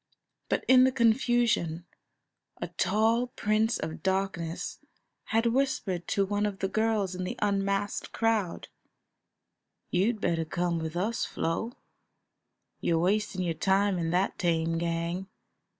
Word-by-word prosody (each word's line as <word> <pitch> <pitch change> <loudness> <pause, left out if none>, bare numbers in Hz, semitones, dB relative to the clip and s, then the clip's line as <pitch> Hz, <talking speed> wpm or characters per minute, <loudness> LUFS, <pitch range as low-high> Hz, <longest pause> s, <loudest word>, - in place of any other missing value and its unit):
But - - 0
in 255 0 +7
the 260 - +4
confusion 230 -8 +2 0.7
a - - -4
tall 220 +6 +2
Prince 220 -1 +1
of 160 0 -5
Darkness 190 -3 -2 0.5
had 225 +1 +1
whispered 230 -8 0
to 200 - +1
one 205 +1 0
of 200 -2 -4
the 195 - -1
girls 215 -2 0
in 185 0 -4
the 180 - -4
unmasked 200 0 -1
crowd: 225 -6 0 1.2
"You'd 210 +5 +1
better 170 -3 0
come 170 +1 -1
with 160 +1 -4
us, 215 +6 0
Flo; 220 +9 -2 1.1
you're 165 - +1
wasting 185 -1 0
time 195 -1 +2
in 165 -1 -1
that 180 +3 0
tame 165 -1 +1
gang. 170 +2 -2
195 Hz, 125 wpm, -29 LUFS, 170-220 Hz, 1.2 s, in